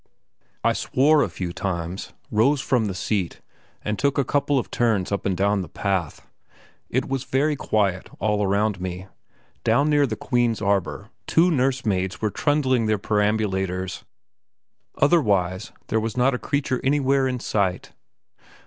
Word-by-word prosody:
I - - +3
swore 150 +3 +3
a - - +1
few 90 -2 -5
times, 90 0 -4 0.2
rose 130 +7 +3
from 125 -3 +1
the 95 -3 -3
seat, 95 -2 -2 0.4
and 105 0 -2
took 140 0 +1
a 140 - +3
couple 145 +1 +1
of 125 - -2
turns 110 -6 +1
up 100 0 -1
and 95 -2 -1
down 100 +1 +2
the 90 - -7
path. 95 -6 -2 0.6
It 130 +6 0
was 135 -2 -2
very 145 +3 +1
quiet 100 -8 0
all 105 -1 0
around 100 0 +1
me; 95 +1 -5 0.5
down 140 +7 +3
near 145 -1 +4
the 110 - -3
Queen's 120 -1 0
arbour 100 +1 -1 0.2
two 175 +2 +4
nursemaids 125 - 0
were 110 -1 -1
trundling 130 -5 +1
their 110 0 +2
perambulators; 95 -3 -1 0.9
otherwise, 100 - +2 0.2
there 110 - +2
was 110 +2 -3
not 130 +2 +3
a 125 - -2
creature 140 -3 -1
anywhere 135 -1 +2
in 125 -1 -2
sight. 100 -5 -1
110 Hz, 150 wpm, -23 LUFS, 95-135 Hz, 0.9 s, near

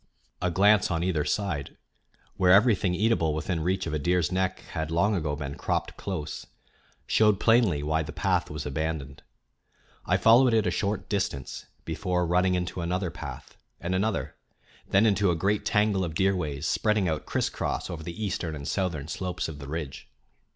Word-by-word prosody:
A 90 - +1
glance 100 +3 +4
on 85 -1 -1
either 85 -5 +1
side, 85 -9 -2 0.6
where 90 -1 +4
everything 100 -3 +4
eatable 95 -7 +2
within 85 +2 -2
reach 95 +4 0
of 80 - -4
a 75 - 0
deer's 85 +1 +1
neck 95 0 -1
had 80 -2 -3
long 100 +6 +2
ago 75 -6 -1
been 70 -1 -5
cropped - - -2
close, 85 -6 -5 0.6
showed 105 -2 +3
plainly 110 -12 +3
why 80 +1 +1
the 75 -1 -5
path 95 -3 0
was 75 0 -5
abandoned. 75 -1 -3 0.8
I - - +2
followed 120 +1 +6
it 110 -2 +3
a 90 - +1
short 100 +1 -2
distance 95 -10 -3 0.2
before 90 -1 -1
running 90 +2 +2
into 90 0 -3
another 90 +1 -1
path, 70 -7 -8 0.2
and 85 +1 -3
another, 100 +3 -1 0.6
then 100 +3 +4
into 100 -2 +3
a 85 - +2
great 100 +5 0
tangle 105 -2 +2
of 80 -3 -4
deer 95 +2 +2
ways 75 -4 -3
spreading 105 -3 +1
out 80 -2 -2
crisscross - - -2
over 80 - -6
the 85 +7 -5
eastern 85 -5 -3
and 70 -1 -7
southern 85 -7 -2
slopes 90 +2 -3
of 75 -3 -8
the 70 - -8
ridge. 75 -3 -6
90 Hz, 175 wpm, -27 LUFS, 80-100 Hz, 0.8 s, followed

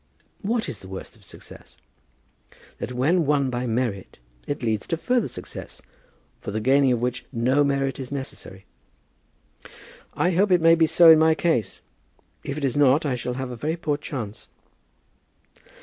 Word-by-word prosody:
"What 225 +2 -1
is 110 - -6
the 95 - -12
worst 95 0 -9
of - - -22
success?" - - -14 1.0
"That - - -5
when 150 +8 +2
won 140 -3 +2
by 125 0 -2
merit 115 -5 -3 0.3
it 145 -3 -4
leads 110 -3 -1
to 165 - -1
further 245 +6 0
success, - - -9 0.6
for - - -7
the 105 +2 -2
gaining 135 +3 +3
of 120 - +1
which 125 0 -3
no 130 +4 +2
merit 140 -1 -1
is 130 -1 -7
necessary." 130 -8 -7 1.5
"I 180 - +1
hope 195 +4 +2
it 180 - +5
may 165 0 +6
be 165 -1 +4
so 165 +1 +7
in 160 - +7
my 160 0 +4
case. 140 - -1 0.6
If 140 - -5
it 145 - -1
is 130 - -1
not 145 +2 +4
I 140 - 0
shall 125 0 -4
have 130 -1 -4
a - - -5
very 155 +8 -3
poor 150 -3 -1
chance. 125 -8 -7
135 Hz, 170 wpm, -24 LUFS, 125-160 Hz, 1.5 s, so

